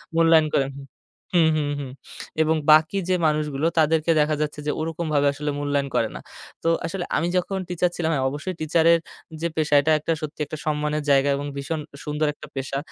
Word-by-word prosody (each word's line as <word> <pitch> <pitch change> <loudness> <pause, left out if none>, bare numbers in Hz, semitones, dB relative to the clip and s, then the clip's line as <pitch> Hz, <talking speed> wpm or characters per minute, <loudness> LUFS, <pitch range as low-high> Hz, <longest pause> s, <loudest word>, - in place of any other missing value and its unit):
মূল্যায়ন 165 -1 +5
করেন 135 0 +1 0.6
হুম, 160 -2 +5
হুম, 145 -2 -1
হুম, 135 -2 -6 0.5
এবং 160 +1 +2 0.2
বাকি 155 +5 +5
যে, 185 - +3
মানুষগুলো 150 0 0
তাদেরকে 160 +1 +3
দেখা 150 0 +1
যাচ্ছে 150 0 -3
যে, - - +2
ওরকমভাবে 155 -2 0
আসলে 145 +1 -3
মূল্যায়ন 145 -1 0
করে - - +2
না। - - -7 0.4
তো 165 - +2 0.2
আসলে 175 +1 -3
আমি 170 - 0
যখন 190 +2 -1
টিচার 180 0 +1
ছিলাম, 165 -2 -1
হ্যাঁ। 135 -2 0
অবশ্যই 155 +6 -5
টিচারের 165 +1 +4 0.4
যে, 170 - +1
পেশা 150 -1 +2
এটা 155 - +1
একটা 165 +2 -1
সত্যি 155 0 -6
একটা 155 - -7
সম্মানের 150 0 -1
জায়গা 140 0 +4
এবং 145 - -4
ভীষণ 145 +3 -3 0.2
সুন্দর 150 +1 -1
একটা 155 - -12
পেশা। 135 0 -3
155 Hz, 185 wpm, -23 LUFS, 145-165 Hz, 0.6 s, মূল্যায়ন